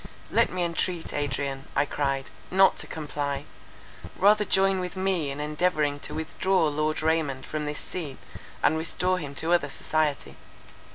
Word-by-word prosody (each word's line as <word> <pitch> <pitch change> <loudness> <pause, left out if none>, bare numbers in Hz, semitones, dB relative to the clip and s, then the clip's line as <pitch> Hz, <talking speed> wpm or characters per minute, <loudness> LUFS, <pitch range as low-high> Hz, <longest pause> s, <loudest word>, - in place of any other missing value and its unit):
"Let - - +3
me 180 -1 -1
entreat 170 0 -1
Adrian," 140 -1 -2
I - - +3
cried, 140 -2 -1 0.2
"not 190 +1 +5
to - - -3
comply: 145 -2 -3 0.7
rather 210 +3 +5
join 195 -1 +3
with 180 +1 -4
me 185 -6 0
in 140 +1 -5
endeavouring 150 -1 +1
to - - -6
withdraw 165 +2 +1
Lord 155 +1 -1
Raymond 155 -5 +1
from 150 -1 -3
this 150 0 -3
scene, 150 -7 -6 0.5
and 160 - +4
restore 180 +3 0
him 140 -3 -6
to 165 +4 +1
other 160 -5 +2
society." 150 0 -1
155 Hz, 155 wpm, -27 LUFS, 145-180 Hz, 0.7 s, not